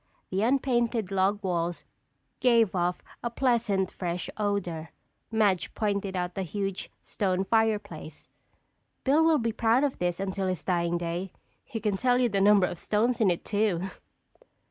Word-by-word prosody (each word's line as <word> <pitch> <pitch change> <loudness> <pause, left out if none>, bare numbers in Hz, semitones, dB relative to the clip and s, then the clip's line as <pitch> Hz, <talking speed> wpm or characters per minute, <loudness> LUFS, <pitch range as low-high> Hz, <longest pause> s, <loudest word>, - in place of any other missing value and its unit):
The 190 +1 0
unpainted 240 -4 +1
log 195 +2 +1
walls 175 -2 -2 0.5
gave 230 -5 +4
off 175 -1 -1 0.2
a 235 - -2
pleasant, 230 -6 +1
fresh 175 -1 -4
odor. 180 -6 -2 0.4
Madge 205 -5 +1
pointed 200 -3 -1
out 180 -1 -2
the 195 - -3
huge 195 +1 -3
stone 190 -1 -1
fireplace. 205 -8 -1 0.8
"Bill 290 +4 +4
will 320 -1 +5
be 230 -3 0
proud 230 +4 +3
of 285 -2 -1
this 175 0 -1
until 195 0 -2
his 185 -2 -2
dying 175 -1 0
day. 175 +2 -3 0.3
He 240 -5 -5
can 210 -2 0
tell 245 +3 +3
you 250 -1 +2
the 200 -2 0
number 200 -1 +6
of 175 - -5
stones 230 +3 +1
in 205 - +5
it 175 - -1
too." 205 -3 0
200 Hz, 155 wpm, -28 LUFS, 180-225 Hz, 0.8 s, number